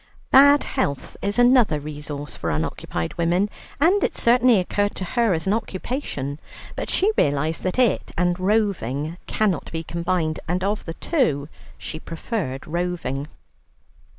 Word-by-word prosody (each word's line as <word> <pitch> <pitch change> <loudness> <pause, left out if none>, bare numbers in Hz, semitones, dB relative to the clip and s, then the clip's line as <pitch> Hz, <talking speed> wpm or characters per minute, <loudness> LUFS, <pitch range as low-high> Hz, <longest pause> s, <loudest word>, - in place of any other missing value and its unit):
Bad 285 +2 +7
health 140 -2 -2
is 200 +2 -1
another 245 - +5
resource 145 -1 -6
for 85 - -3
unoccupied 80 +1 -3
women, 175 +5 +2 0.3
and 360 +7 +4
it - - 0
certainly 245 0 +4
occurred 205 +3 0
to - - -4
her 230 +1 +2
as 160 - -4
an 195 - +2
occupation, 185 - -3 0.4
but - - -4
she 400 +4 +2
realized 145 +3 +1
that 185 +3 -2
it 250 -5 +2
and 175 +1 +1
roving 180 - 0
cannot 200 -8 0
be 165 0 -3
combined, 170 -1 -1
and 180 +2 -1
of 205 +2 -1
the 165 - -6
two 155 - 0 0.3
she 155 - -6
preferred 165 - -4
roving. 165 -5 -2
180 Hz, 145 wpm, -23 LUFS, 150-220 Hz, 0.4 s, Bad